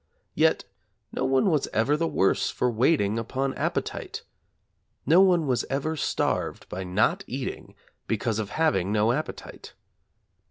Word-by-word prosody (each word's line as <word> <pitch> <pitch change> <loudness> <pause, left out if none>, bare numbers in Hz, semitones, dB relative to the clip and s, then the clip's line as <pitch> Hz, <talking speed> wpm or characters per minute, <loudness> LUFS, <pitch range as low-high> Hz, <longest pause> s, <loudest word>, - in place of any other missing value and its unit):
Yet 160 +1 +2 0.5
no - - -3
one 135 +8 +3
was 150 -4 +1
ever 120 +7 +2
the 165 +2 0
worse 95 - +1
for 125 - 0
waiting 115 -3 +2
upon 135 +4 -2
appetite. - - -3 0.8
No 165 +7 +6
one 180 -4 +4
was 125 -3 0
ever 145 +4 -1
starved 150 - -2
by 95 - -5
not 90 0 +1
eating - - -6 0.3
because 110 -1 -1
of 105 -2 -3
having 150 - +1
no 105 +2 +3
appetite. 150 +5 -6
135 Hz, 135 wpm, -26 LUFS, 110-155 Hz, 0.8 s, No